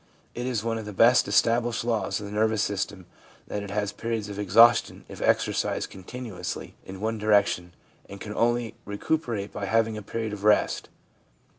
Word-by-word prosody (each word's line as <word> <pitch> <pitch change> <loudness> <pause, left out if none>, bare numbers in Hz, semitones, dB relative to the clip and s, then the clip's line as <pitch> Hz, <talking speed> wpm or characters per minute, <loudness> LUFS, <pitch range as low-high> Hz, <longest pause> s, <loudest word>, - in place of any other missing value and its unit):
It 120 +1 -4
is 120 -5 -1
one 115 -1 -1
of 110 - -7
the 105 - -7
best 115 +6 +5
established 120 0 +2
Jaws 115 -2 -1
of 105 - -7
the 100 - -7
nervous 110 0 +1
system 100 -2 -3 0.4
that 105 - -4
it 100 - -7
has 105 0 -1
periods 115 -2 -3
of 100 0 -6
exhaustion 115 +4 +5
if - - -10
exercised - - 0
continuously 105 +1 -7
in 95 0 -9
one 110 0 -1
direction, 100 -4 +2 0.3
and 100 - -9
can 105 +1 -6
only 120 0 +1
recuperate 105 -1 -2
by 100 - -4
having 110 +1 +1
a - - -5
period 110 +1 -4
of 100 -1 -7
rest. 105 0 +2
110 Hz, 175 wpm, -26 LUFS, 100-115 Hz, 0.4 s, best